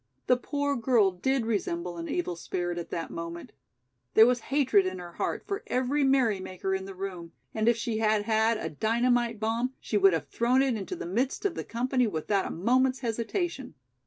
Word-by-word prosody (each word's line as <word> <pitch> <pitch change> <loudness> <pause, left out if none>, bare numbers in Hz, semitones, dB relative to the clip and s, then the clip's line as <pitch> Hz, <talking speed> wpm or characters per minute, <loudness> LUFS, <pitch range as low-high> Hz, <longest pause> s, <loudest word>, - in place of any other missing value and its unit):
The 250 - +4
poor 285 +2 -1
girl 230 -5 +3
did 250 +7 0
resemble 175 -5 -2
an 165 0 -5
evil 175 0 -2
spirit 175 +1 -3
at 170 - -7
that 165 - -4
moment. 170 +1 -6 0.6
There 220 - +9
was 245 0 +2
hatred 260 -9 +3
in 185 0 -4
her 175 -1 -8
heart - - -3
for 400 +1 -3
every 260 - +1
merrymaker 205 -8 +1
in 190 0 -2
the 195 0 -8
room, 180 -3 -6 0.2
and 220 +1 +2
if 235 - +2
she 230 -1 -2
had 215 -1 +2
had 220 +1 +2
a - - -4
dynamite 235 - +1
bomb 230 +4 -1
she 210 - -1
would 195 -2 +5
have 165 - -2
thrown 250 +3 +2
it 270 -2 +1
into 215 - -4
the - - -6
midst 245 - -1
of 400 - +1
the - - -4
company 250 +1 0
without 195 +2 -1
a - - -5
moment's 255 +8 +1
hesitation. 250 - -3
225 Hz, 195 wpm, -28 LUFS, 185-255 Hz, 0.6 s, There